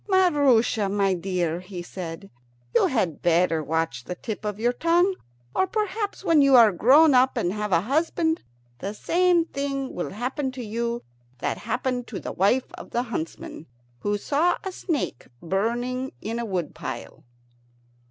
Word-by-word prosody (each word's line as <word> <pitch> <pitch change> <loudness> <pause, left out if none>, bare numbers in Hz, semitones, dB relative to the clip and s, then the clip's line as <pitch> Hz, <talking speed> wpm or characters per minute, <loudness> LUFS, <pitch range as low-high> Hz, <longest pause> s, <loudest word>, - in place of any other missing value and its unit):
"Maroosia, 285 - +3
my 195 -1 +2
dear," 175 -2 -1
he 180 -1 -8
said, 180 +1 -7 0.4
"you - - +4
had 185 - -1
better 170 -2 +2
watch 160 -5 -1
the 180 - -5
tip 220 +3 -6
of 210 0 -3
your 240 +2 +2
tongue, 345 +7 +3 0.4
or 380 - +2
perhaps, 425 -2 -2
when 330 -6 +4
you 275 -1 +6
are 230 -4 +8
grown 280 - +6
up 255 +1 +4
and 175 - 0
have 210 -1 -3
a 165 -2 +4
husband, 320 - 0 0.4
the 200 +2 -4
same 350 +4 +2
thing 275 -3 -3
will 175 - -3
happen 260 +6 -3
to 250 -2 -6
you 235 +2 -2 0.3
that - - -2
happened 250 +1 -1
to 210 - -5
the - - -5
wife 205 +8 +1
of - - -10
the 240 - 0
huntsman 165 - -6 0.3
who 205 +6 0
saw 310 - +1
a 385 - -4
snake 325 - -3
in - - -23
a - - -11
burning 245 +6 -1 0.4
wood 180 -5 -2
pile." - - -7
235 Hz, 160 wpm, -25 LUFS, 190-285 Hz, 0.4 s, are